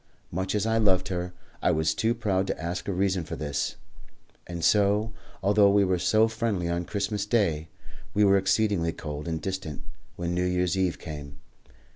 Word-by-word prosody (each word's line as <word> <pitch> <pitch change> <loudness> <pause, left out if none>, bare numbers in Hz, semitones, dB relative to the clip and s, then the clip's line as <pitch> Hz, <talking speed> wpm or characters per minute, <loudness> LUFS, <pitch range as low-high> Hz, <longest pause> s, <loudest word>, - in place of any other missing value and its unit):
Much 95 +3 -2
as 105 0 +1
I 115 0 +2
loved 95 -3 +3
her, 90 -1 -2 0.3
I - - +3
was 80 0 +2
too 110 +8 +1
proud 100 -4 0
to - - -2
ask 85 +2 -4
a - - 0
reason 95 -1 +1
for 75 - -6
this, 70 -2 -2 0.7
and 85 -2 -3
so, 105 +1 +3 0.3
although 100 +1 +5
we 100 0 +4
were 90 -1 +1
so 110 +5 +4
friendly 110 -6 -1
on 85 0 -1
Christmas 100 +1 -2
Day, 85 -9 +1 0.5
we 105 - +4
were 100 -1 +6
exceedingly 95 -3 +1
cold 75 -1 -6
and 80 -1 -2
distant 95 -4 -5 0.3
when 85 0 -2
New 90 0 0
Year's 90 0 +1
Eve 95 -2 0
came. 70 -3 -8
95 Hz, 180 wpm, -27 LUFS, 85-105 Hz, 0.7 s, were